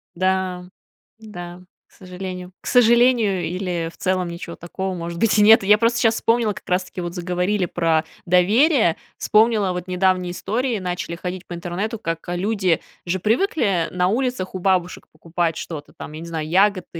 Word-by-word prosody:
Да, 185 0 -1 0.5
да, 175 -5 -9 0.3
к - - -38
сожалению. 180 -1 -8
К - - -10
сожалению, 235 -5 +4
или, 175 -2 -3
в - - -21
целом, 185 -1 0
ничего 170 0 -7
такого, 190 +2 -5
может 170 0 -5
быть, 220 +1 +3
и - - +5
нет. 220 +1 +7
Я 210 +2 +5
просто 235 +2 +1
сейчас 225 -1 +3
вспомнила, 230 -2 +1
как 205 - -13
раз 180 -1 +1
таки, 180 - -10
вот 175 -1 -5
заговорили 180 +2 -1
про 165 -2 +1 0.2
доверие, 205 - +4 0.2
вспомнила 215 -3 +3
вот 180 0 -5
недавние 185 -1 +1
истории, 225 +6 -2
начали 180 -2 -4
ходить 180 +1 -6
по - - -7
интернету, 185 +6 -4
как, 165 -5 -4
а, 175 - -2
люди 190 -3 0 0.2
же 180 +2 -1
привыкли 215 - +1
на 180 0 +1
улицах 235 -3 -1
у 185 - -3
бабушек 180 -1 0
покупать 165 +1 -2
что-то 150 -3 -7
там, - - -9
я 155 - -7
не 170 - -8
знаю, 160 -2 -4
ягоды, 195 +1 +3
185 Hz, 175 wpm, -21 LUFS, 175-210 Hz, 0.5 s, нет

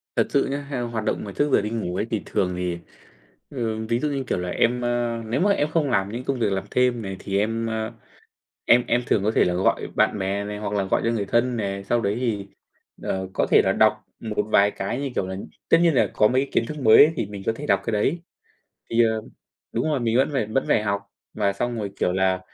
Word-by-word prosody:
Thật - - +2
sự 140 - +2
nhá, 140 +1 -4
theo 125 -4 -2
hoạt 115 -2 -3
động - - -1
mà 100 - -6
trước 145 +8 0
giờ - - +5
đi 105 - -3
ngủ 105 -6 -3
ấy, 105 - -1
thì 110 -4 -1
thường 90 -1 -1
thì 90 -1 -2 0.7
thường 110 -4 -3
ví 115 +1 +1
dụ 150 - -1
như, 135 -2 -2
kiểu - - 0
là, 90 0 -3
em, 125 +5 +1
ơ 120 -1 -1
nếu 115 +3 -1
mà 200 +1 +4
em 150 -6 +1
không 155 -4 +1
làm 100 -3 0
những 120 +2 -5
công 135 -2 -2
việc 105 -3 +1
làm 95 0 -1
thêm 125 -2 +2
này 95 -2 -5
thì 100 0 -2
em, 115 +2 0
ơ, 110 0 -3 0.7
em 120 +1 +5
em 120 - +2
thường 100 - +2
có 110 - +2
thể - - +3
là 90 - 0
gọi 90 +2 +1
bạn 105 - +2
bè 100 +2 -1
này 105 0 -5
hoặc 105 0 -4
là 100 -1 +1
gọi 95 - 0
cho 115 - +2
người 105 -4 -1
thân 120 +3 +1
này, 100 -2 -3
sau 120 +4 0
đấy 100 0 0
thì, 105 -5 -2 0.6
ờ, 95 0 -2
có - - +1
thể - - +7
là - - +2
đọc - - +4 0.3
một 105 -2 -2
vài 100 +1 +5
cái 100 +7 -3
như, 140 - -2
kiểu 95 - -1
là 95 - -4 0.3
tất - - +7
nhiên 170 -3 +4
là - - +3
có 105 - +4
mấy 130 +3 +2
cái 140 - -4
kiến 115 - +1
thức 150 +4 -6
mới 135 +6 +7
thì 115 - -1
mình 100 -1 -8
có - - +2
thể - - -7
đọc 100 -1 +3
cái 115 - -1
đấy. 135 +11 +1 0.7
Thì, 115 +1 +4
ờ 110 -1 0 0.5
đúng - - -1
rồi, 140 -4 0
mình 115 0 +1
vẫn 135 - +3
phải 130 -6 0
vẫn 110 +5 0
phải 105 - +3
học 100 -1 -1 0.3
và 100 -2 +1
xong 120 +3 -3
rồi, 100 -2 -3
kiểu 90 - +2
là, 95 0 +1
110 Hz, 265 wpm, -24 LUFS, 100-120 Hz, 0.7 s, thể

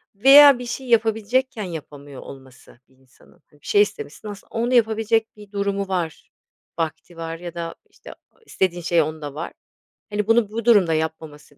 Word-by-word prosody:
Veya 275 +4 +8
bir 245 - -6
şeyi 250 +2 -6
yapabilecekken 225 +1 +1
yapamıyor 145 -6 -9
olması 130 -3 -14
bir 130 - -28
insanın. 130 +3 -25
Hani, 145 -1 -25
bir - - -15
şey 205 - +4
istemişsin 205 -1 -3
aslında 205 -1 -10
onu 240 +2 0
yapabilecek 225 -1 +1
bir 205 -1 -14
durumu 200 -1 -2
var, 175 -4 -4 0.5
vakti 165 +1 -4
var 165 0 -5
ya 175 -1 -8
da, 170 -1 -6
işte, - - -14
a - - -13 0.2
o - - -35
istediğin 180 - -1
şey 170 0 +2
onda 155 -2 -5
var. 160 +3 -6 0.6
Hani, 210 0 -2
bunu 225 -2 +3
bu 230 0 -4
durumda 200 -9 +5
yapmaması 155 -2 -5
190 Hz, 175 wpm, -22 LUFS, 160-225 Hz, 0.6 s, Veya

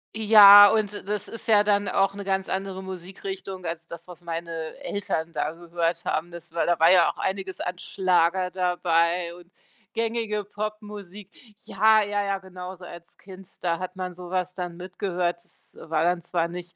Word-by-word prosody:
Ja, 205 -2 +9
und 215 -2 0
das 210 0 -3
ist 230 0 -9
ja 210 -2 +5
dann 205 -1 +1
auch 195 0 +1
'ne 200 - -6
ganz 190 0 -1
andere 190 0 -3
Musikrichtung 190 0 -7
als 165 0 -5
das, 170 +1 -10
was 180 -1 -12
meine 170 0 -5 0.3
Eltern 195 -9 -3
da 150 0 -1
gehört 170 0 -3
haben. 165 +3 -2
Das 170 -1 -11
war 170 - 0
da 175 -2 +1
war 165 +1 +6
ja 180 -2 +6
auch - - -24
einiges 190 -1 -3
an 180 0 -4
Schlager 180 0 +1
dabei 175 -1 0
und 175 0 -17 0.4
gängige 225 -2 -1
Popmusik. 210 -2 -7 0.4
Ja, 215 +2 +4
ja, 205 0 -1
ja, 200 0 -1
genau 185 -1 -9
so 180 0 -13
als 170 -1 -13
Kind, 190 -1 -13 0.2
da 170 -2 0
hat 185 0 -6
man 185 -1 -5
so 180 0 -10
was 185 0 -2
dann 175 -2 -5
mitgehört. 180 -1 -3
Das 180 - -16
war 160 0 -1
dann 175 0 +1
zwar 170 0 -1
nicht 175 0 -9
185 Hz, 185 wpm, -25 LUFS, 175-200 Hz, 0.4 s, Ja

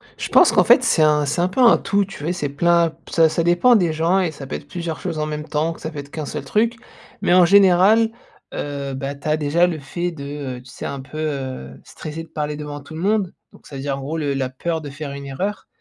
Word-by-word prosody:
Je - - -5
pense - - +6
qu'en - - +4
fait - - +6
c'est - - +3
un 150 -1 +3
c'est 145 +5 0
un 175 - +2
peu 185 +8 -5
un 240 -2 +7
tout, 200 0 0
tu 195 - -11
vois 150 +3 -3
et - - 0
c'est 150 -6 -3
plein 170 +3 +3
p - - -18
ça 165 -1 +4
ça 170 - 0
dépend 175 +9 +4
des 175 -6 +2
gens 165 +4 +2
et 180 -4 0
ça 140 -3 -9
peut - - -4
être - - -8
plusieurs 170 -2 -5
choses 155 - -4
en 150 - 0
même 150 0 -5
temps, 155 +2 -1
que - - -16
ça 160 - -4
peut 150 - -7
être 140 0 -9
qu'un 155 -2 -5
seul - - -5
truc 230 +3 +1 0.5
mais - - +2
en 180 -1 +7
général, 200 +4 +5 0.4
heu, 140 -1 -4
bah, 135 +1 -4
tu 140 +2 -9
as 155 0 +2
déjà 155 +3 +2
le 165 -3 -3
fait 175 +5 -4
de, 140 -4 -6
heu - - -11
tu 125 - -16
sais - - -8
un 140 -1 -4
peu, 140 +3 -11
heu, 135 - -4
stresser 155 +1 -8
de - - -14
parler 150 -1 -3
devant 150 -1 -6
tout 140 +2 -13
le 160 - -5
monde, 200 -1 +1 0.2
donc - - -20
ça 140 - -10
veut 135 - -5
dire 140 0 -2
en - - -7
gros 150 +4 -4
le 145 -3 -1
la 135 -1 -2
peur 160 +5 -3
de 145 - -7
faire 145 +1 -7
une 140 0 -7
erreur 185 +10 -4
155 Hz, 285 wpm, -21 LUFS, 140-175 Hz, 0.5 s, un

